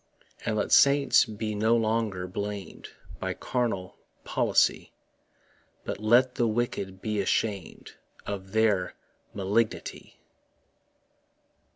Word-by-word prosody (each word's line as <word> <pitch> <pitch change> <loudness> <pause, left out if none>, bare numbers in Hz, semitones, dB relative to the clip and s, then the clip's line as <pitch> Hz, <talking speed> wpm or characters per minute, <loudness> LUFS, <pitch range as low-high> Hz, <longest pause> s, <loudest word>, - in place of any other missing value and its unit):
And 110 - -1
let 105 - -1
saints 140 0 +5
be 110 -1 -4
no 110 +3 +2
longer 110 -5 0
blam'd 100 +2 -6 0.3
By - - -3
carnal 110 -7 -2 0.3
policy, - - +1 0.9
But - - -5
let 120 +4 +4
the 120 - +1
wicked 105 -4 -3
be 105 -2 -1
asham'd 100 0 -2 0.3
Of 95 -2 -6
their 105 -4 +2 0.4
malignity. 105 +3 -2
110 Hz, 95 wpm, -27 LUFS, 100-115 Hz, 0.9 s, saints